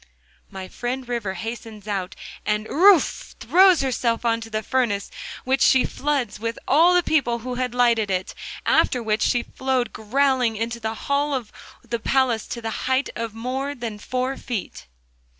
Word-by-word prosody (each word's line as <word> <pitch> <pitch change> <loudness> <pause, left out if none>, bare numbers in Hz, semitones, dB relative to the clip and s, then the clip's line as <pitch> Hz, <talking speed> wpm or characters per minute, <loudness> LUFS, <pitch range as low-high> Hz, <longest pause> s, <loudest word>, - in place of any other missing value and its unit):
My 190 -1 -7
friend 250 +5 -4
River 230 -6 -3
hastens 225 -2 -7
out, 195 -2 -3 0.3
and 210 0 -1
errouf! 360 - +3
throws 370 -2 +5
herself 240 -3 0
into 230 -1 0
the 215 0 -2
furnace, 225 -6 0 0.3
which 265 +1 +1
she 260 - +5
floods, 270 -8 -2
with 230 +1 -3
all 335 +6 +5
the 355 - +4
people 265 -8 +1
who 255 - -3
had 250 -1 -2
lighted 235 -4 +3
it; 185 -1 -2 0.3
after 250 -2 +3
which 215 0 0
she 240 -1 +2
flowed 260 -3 -2
growling 250 +1 +1
into 230 +2 -3
the 220 0 -3
hall 280 0 +1
of 240 -5 -5 0.4
the 235 -1 -2
palace 250 -2 +1
to 235 - -6
the 225 +2 -4
height 260 +1 +1
of 230 -2 -4
more 265 +5 -3
than 230 -5 -6
four 255 +4 -2
feet. 235 -7 -6
240 Hz, 165 wpm, -23 LUFS, 220-265 Hz, 0.4 s, throws